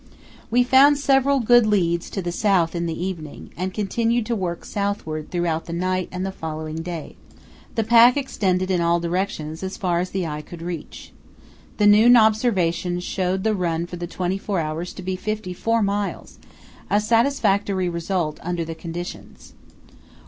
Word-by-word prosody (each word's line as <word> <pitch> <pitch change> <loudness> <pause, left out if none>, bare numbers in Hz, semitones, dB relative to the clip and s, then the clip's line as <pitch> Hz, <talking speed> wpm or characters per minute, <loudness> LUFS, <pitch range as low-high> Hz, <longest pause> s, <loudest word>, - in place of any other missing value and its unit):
We 245 +2 +4
found 270 +3 +6
several 275 0 +3
good 240 -1 +5
leads 170 -5 +1
to 195 - -4
the 175 - -2
south 180 -3 +2
in 170 -1 -2
the 165 0 -4
evening, 165 -6 -7
and 185 +2 -3
continued 225 +4 0
to 235 - -1
work 175 -4 -4
southward 200 -7 -3
throughout 170 -2 -1
the 170 - -6
night 185 +1 -1
and 185 +1 -3
the 195 - -3
following 155 -2 -6
day. 165 -1 -6 0.6
The 225 - +1
pack 235 +3 +6
extended 190 -9 0
in 180 -2 +1
all 170 0 +2
directions 170 -3 -3
as 190 0 -5
far 175 -3 0
as 180 +1 -2
the 190 -2 -2
eye 150 -1 -4
could 165 +2 -10
reach. 170 -3 -7 0.6
The 210 - +2
noon 220 +4 +7
observation 195 -6 +2
showed 185 +1 -2
the 220 - +2
run 170 -3 -1
for 175 0 -8
the 175 0 -5
twenty 185 +2 -2
four 195 -2 -2
hours 160 +2 -3
to 185 - -9
be 185 +1 -2
54 215 +2 -1
miles, 200 0 -3 0.5
a 205 - +3
satisfactory 210 -5 +1
result 170 -2 -2
under 175 -1 -3
the 165 - -5
conditions. 170 +2 -8
185 Hz, 170 wpm, -22 LUFS, 170-215 Hz, 0.6 s, noon